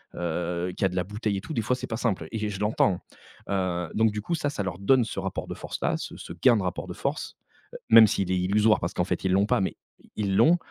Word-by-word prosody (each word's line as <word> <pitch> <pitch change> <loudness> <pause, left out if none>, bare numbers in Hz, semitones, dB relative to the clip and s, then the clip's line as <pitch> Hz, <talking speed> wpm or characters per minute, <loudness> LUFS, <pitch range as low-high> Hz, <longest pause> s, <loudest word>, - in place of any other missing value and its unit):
heu, 85 +1 -2
qui 100 - +1
a - - +3
de 90 - -7
la 90 - +1
bouteille 105 +1 -2
et - - -4
tout, 155 - -7
des 115 - 0
fois 125 +4 0
c'est 125 - -6
pas 110 - -3
simple 100 -10 -1
et 110 -2 -2
je 100 - -5
l'entends, 105 -3 +2 0.5
heu. 90 -3 -1
Donc 110 -1 +3
du 105 - -4
coup, 140 - -3
ça 145 -2 -1
ça 105 - -3
leur 90 -2 -4
donne 125 +5 +4
ce 110 - -5
rapport 95 -1 -4
de - - -5
force-là, - - -2
ce - - -7
ce - - -9
gain 115 +8 +4
de 100 - -1
rapport 90 -1 -3
de - - -6
force, - - -3 0.4
heu, - - -6
même 110 -1 +9
s'il 95 -3 -1
est 95 - +2
illusoire 105 +4 +3
parce 85 +3 -3
qu'en 90 - 0
fait 95 - -3
ils 95 - +2
l'ont 100 +2 +4
pas, 105 - +2
mais 95 - -1 0.4
ils 100 -2 -1
l'ont, 170 +2 +6
100 Hz, 275 wpm, -26 LUFS, 90-110 Hz, 0.5 s, même